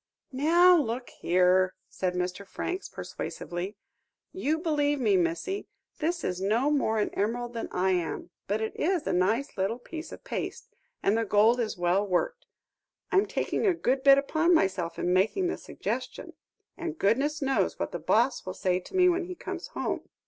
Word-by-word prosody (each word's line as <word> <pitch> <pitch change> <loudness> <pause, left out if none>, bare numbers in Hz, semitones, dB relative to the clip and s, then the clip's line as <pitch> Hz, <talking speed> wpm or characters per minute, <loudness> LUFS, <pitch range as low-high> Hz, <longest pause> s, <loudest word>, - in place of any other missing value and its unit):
"Now 340 +7 +6
look 245 -3 -2
here," 185 +1 +2
said 180 -1 -2
Mr. 180 +2 -2
Franks 360 - -4
persuasively, 180 +4 -6 0.6
"you 320 -4 0
believe 295 -3 +1
me, 215 -6 +3
missy; 180 - -1 0.3
this 340 +3 -1
is 180 0 -2
no 230 +9 +2
more 245 -7 +1
an 210 - +1
emerald 240 +4 -1
than 230 - -4
I 190 +1 +1
am, 175 -3 -2 0.2
but 210 +2 0
it 220 - -3
is 350 -1 0
a - - 0
nice 215 +10 +1
little 195 +5 0
bit 320 +6 -8
of - - -10
paste, - - -5 0.3
and 200 - +3
the 230 - +1
gold 220 +3 +4
is 225 -5 -2
well 175 +3 +2
worked. 205 - -1 0.6
I'm 395 +2 +3
taking 445 -1 -1
a 370 - +3
good 265 -4 0
bit 275 0 +7
upon 315 +5 +3
myself 185 - 0
in 180 - 0
making 220 - +2
the - - -3
suggestion, - - -5 0.4
and 335 -2 -5
goodness 275 +9 +1
knows 270 -2 0
what - - -3
the - - -4
boss 240 +4 +2
will 185 -1 -6
say 185 -2 +1
to 185 - -11
me 365 -1 +6
when 355 0 +2
he 365 0 -6
comes - - -6
home. - - -4
240 Hz, 180 wpm, -28 LUFS, 190-320 Hz, 0.6 s, bit